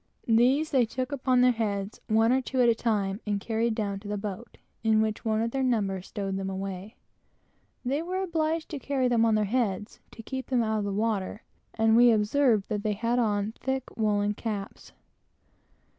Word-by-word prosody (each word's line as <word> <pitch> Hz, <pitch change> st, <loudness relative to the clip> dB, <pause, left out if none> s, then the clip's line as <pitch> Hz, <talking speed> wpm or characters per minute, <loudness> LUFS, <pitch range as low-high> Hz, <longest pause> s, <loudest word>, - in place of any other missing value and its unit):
These 255 Hz, +7 st, +3 dB
they 255 Hz, -5 st, +3 dB
took 255 Hz, +3 st, -4 dB
upon 255 Hz, -2 st, +2 dB
their 250 Hz, 0 st, +6 dB
heads, 205 Hz, -3 st, -3 dB
one 225 Hz, +2 st, +3 dB
or 260 Hz, +1 st, +3 dB
two 260 Hz, 0 st, -3 dB
at 245 Hz, -, +5 dB
a 235 Hz, -, +5 dB
time, 210 Hz, -3 st, -1 dB
and 205 Hz, -1 st, 0 dB
carried 225 Hz, +2 st, -1 dB
down 200 Hz, -3 st, -2 dB
to 205 Hz, -, -11 dB
the 205 Hz, 0 st, -2 dB
boat, 205 Hz, +2 st, -7 dB, 0.3 s
where 220 Hz, -1 st, +3 dB
one 220 Hz, 0 st, 0 dB
of 230 Hz, -, -2 dB
their 270 Hz, -, -1 dB
number 205 Hz, -7 st, 0 dB
stowed 195 Hz, 0 st, -4 dB
them 195 Hz, 0 st, -3 dB
away. 195 Hz, +2 st, -5 dB, 0.9 s
They 275 Hz, +5 st, 0 dB
were 370 Hz, +3 st, -2 dB
obliged 325 Hz, -2 st, -1 dB
to 295 Hz, -, -5 dB
carry 270 Hz, -2 st, 0 dB
them 235 Hz, -2 st, +3 dB
on 225 Hz, -1 st, +3 dB
their 215 Hz, -1 st, +2 dB
heads, 210 Hz, -2 st, -2 dB
to 225 Hz, -, -11 dB
keep 260 Hz, +2 st, -5 dB
them 250 Hz, -3 st, +2 dB
out 220 Hz, -1 st, 0 dB
of 205 Hz, -, -2 dB
the 200 Hz, -, -2 dB
water, 210 Hz, 0 st, -2 dB, 0.3 s
and 225 Hz, 0 st, +3 dB
we 240 Hz, +1 st, +7 dB
observed 220 Hz, 0 st, +2 dB
that 210 Hz, -1 st, -1 dB
they 210 Hz, 0 st, 0 dB
had 230 Hz, +4 st, 0 dB
on 210 Hz, -2 st, 0 dB
thick 265 Hz, -1 st, -3 dB
woolen 210 Hz, -2 st, +1 dB
caps. 210 Hz, -1 st, -6 dB
225 Hz, 195 wpm, -27 LUFS, 205-250 Hz, 0.9 s, we